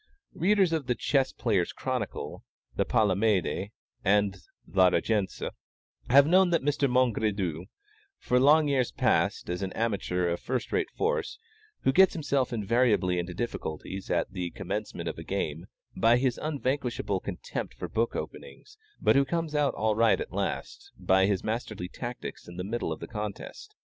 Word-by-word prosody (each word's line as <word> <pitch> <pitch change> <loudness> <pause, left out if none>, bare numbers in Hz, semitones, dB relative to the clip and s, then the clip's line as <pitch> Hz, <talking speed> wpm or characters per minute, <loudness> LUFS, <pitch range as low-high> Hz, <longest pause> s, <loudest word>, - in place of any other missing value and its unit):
Readers 190 -1 +3
of 155 -5 -1
the 125 - +1
Chess 135 +3 +1
Players' 100 -8 0
Chronicle, - - -4 0.3
of - - -23
the - - +2
Palamède, 100 -2 +1 0.3
and 100 0 +3 0.3
La 95 -1 +4
Régence, 105 +1 0 0.6
have 140 +2 +7
known 185 +3 +5
Mr. 145 -4 +1
Mongredieu 105 -9 +1 0.5
for 125 - +1
long 150 +3 +5
years 135 -4 +1
past, - - +1
as 90 +2 -3
an 95 -1 -2
amateur 100 -5 -1
of 85 0 -1
first 130 0 -3
rate 430 -4 0
force, 445 -1 -1 0.4
who - - +3
gets 190 +3 +6
himself 140 -5 0
invariably 105 -5 +2
into 85 0 -4
difficulties 95 -3 -5
at - - 0
the 90 -3 -3
commencement - - -5
of - - -4
a - - -6
game, 85 -3 -3 0.3
by 115 +1 +4
his 125 -1 0
unvanquishable 130 -8 -1
contempt 90 -2 -5
for - - -5
book 115 +1 -1
openings, 420 +1 -8 0.2
but - - +3
who 140 - +5
comes 165 +1 -2
out 145 -2 +1
all 110 +1 +1
right 115 0 +4
at - - -6
last, - - -4
by 95 0 +3
his 100 -3 0
masterly 110 -4 -3
tactics 120 +6 -7
in 85 0 -10
the 90 - -3
middle 115 +5 -2
of - - -5
the - - -6
contest. 105 -3 -7
115 Hz, 160 wpm, -28 LUFS, 95-140 Hz, 0.6 s, have